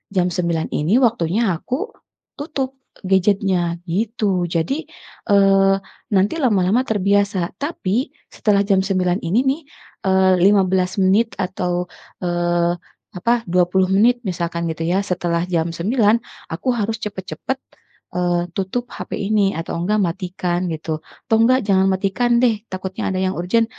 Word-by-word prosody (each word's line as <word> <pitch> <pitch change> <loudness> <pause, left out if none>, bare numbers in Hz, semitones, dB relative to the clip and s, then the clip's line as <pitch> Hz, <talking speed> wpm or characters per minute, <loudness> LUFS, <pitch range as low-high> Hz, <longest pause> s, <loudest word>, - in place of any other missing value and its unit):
"Jam 180 -1 +3
9.00 170 -2 -1
ini 160 +9 +1
waktunya 225 -4 +2
aku 260 - -4 0.5
tutup 275 -3 -3 0.3
gadget-nya," 190 -2 +2
gitu. 195 -1 0
Jadi 180 - -1 0.4
eee, 195 -1 +5 0.4
nanti 195 +2 +3
lama-lama 210 -2 +3
terbiasa. 200 -3 +1
Tapi 260 - -1 0.3
setelah 205 -3 +2
jam 195 -1 +3
9 185 -1 0
ini 180 +8 +1
nih 270 +4 +1 0.5
eee, 190 0 +4
15 190 -1 +3
menit 200 +4 +2
atau 180 -2 -2 0.4
eee 175 0 +1 0.4
apa, 235 +6 +1
20 180 +1 +2
menit 235 +5 +4
misalkan 170 -2 -2
gitu 160 +1 -5
ya, 185 +3 +2
"Setelah 175 -3 -1
jam 165 -1 0
9.00 215 +3 +3 0.4
aku 180 +10 -2
harus 220 +1 -1
cepat-cepat 210 +5 -4 0.6
eee, 175 -1 +1
tutup 195 +6 -2
HP - - -8
ini 200 -1 +2
atau 165 - -4
enggak 200 +5 +1
matikan," 180 0 -2
gitu, 160 -1 -4 0.2
atau 225 - +2
enggak 255 +3 +5
jangan 190 -1 +3
matikan 195 +6 0
deh, 225 -4 +2
takutnya 185 0 -4
ada 190 - -2
yang 185 0 0
urgen, 185 +7 +1
190 Hz, 135 wpm, -20 LUFS, 175-215 Hz, 0.6 s, eee